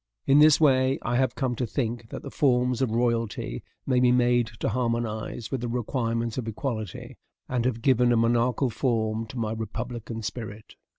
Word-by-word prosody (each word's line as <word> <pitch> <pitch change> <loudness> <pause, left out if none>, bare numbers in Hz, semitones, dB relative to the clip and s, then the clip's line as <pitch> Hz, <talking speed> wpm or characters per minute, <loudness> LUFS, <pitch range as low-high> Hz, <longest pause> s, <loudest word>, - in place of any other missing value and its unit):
In 140 +1 +5
this 155 -1 +7
way, 135 -3 +4
I 120 - 0
have 130 -1 +1
come 130 -3 -1
to 125 - -1
think 115 -2 -3
that - - -7
the - - -7
forms 125 -4 +2
of 130 - +2
royalty 115 - -1 0.2
may 130 -2 +2
be 125 0 +4
made 120 -1 +3
to - - +1
harmonize 115 -1 -2
with 130 - -2
the 120 - -2
requirements 115 -1 -2
of 115 - -5
equality, 110 -2 -5 0.3
and 125 -2 -1
have 115 -3 -1
given 125 -2 +4
a 120 - +3
monarchical 120 +2 +2
form 110 -1 -1
to 125 - -9
my 110 -2 -1
republican 115 +1 -5
spirit. 110 -1 -6
120 Hz, 180 wpm, -26 LUFS, 115-125 Hz, 0.3 s, this